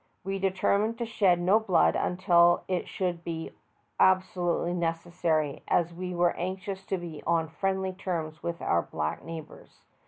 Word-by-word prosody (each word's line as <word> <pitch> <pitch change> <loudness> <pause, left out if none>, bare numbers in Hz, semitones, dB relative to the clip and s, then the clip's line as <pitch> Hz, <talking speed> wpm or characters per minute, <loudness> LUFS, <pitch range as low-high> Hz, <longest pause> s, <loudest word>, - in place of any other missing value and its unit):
We 195 0 -3
determined 200 +4 +1
to 235 - -2
shed 195 -6 +2
no 190 +5 +4
blood 180 - +3
unless 175 -1 +3
it 185 -2 -1
should 180 -4 -2
be 165 -1 -5 0.5
abso 190 0 +4
lutely 175 0 0
necessary, 165 -3 -1
as 170 -1 +1
we 180 +1 -5
were 175 0 +3
anxious 190 +2 -4
to 190 - 0
be 170 -4 -7
on 165 -1 +2
friendly 190 +2 -1
terms 165 -5 -4
with 170 0 -4
our 85 - +2
black 75 -1 -4
neighbors. 165 -2 -10
175 Hz, 155 wpm, -28 LUFS, 165-190 Hz, 0.5 s, no